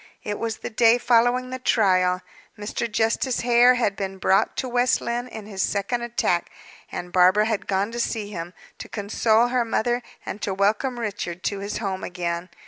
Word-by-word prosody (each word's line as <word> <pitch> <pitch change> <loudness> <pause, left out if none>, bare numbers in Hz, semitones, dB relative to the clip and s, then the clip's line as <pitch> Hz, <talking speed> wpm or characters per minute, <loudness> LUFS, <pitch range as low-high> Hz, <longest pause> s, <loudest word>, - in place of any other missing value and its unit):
It 205 -1 -4
was 225 -1 -2
the - - -7
day 230 +1 +5
following 245 +1 +2
the 255 - -4
trial. 185 -6 +2 0.3
Mr. 215 +2 -4
Justice 225 +3 0
Hare 245 +1 +5
had 220 -5 0
been 195 -1 -4
brought 190 +1 +2
to 260 - -2
West 245 0 +2
Lynne 240 +1 -3
in 220 -4 -9
his 200 -2 -4
second 205 +6 -1
attack, 235 -7 0 0.4
and 175 0 -6
Barbara 185 +3 +5
had 220 -2 -2
gone 200 +2 0
to 235 - -5
see 215 -3 -2
him, 175 -1 -6 0.2
to - - -8
console 220 +3 +2
her 250 -1 +1
mother, 240 +1 0 0.2
and 210 - -6
to 195 - -2
welcome 215 +6 +1
Richard 185 -5 -4
to 200 - -2
his 200 +1 -4
home 195 -3 -3
again. 175 0 -3
215 Hz, 185 wpm, -24 LUFS, 195-240 Hz, 0.4 s, day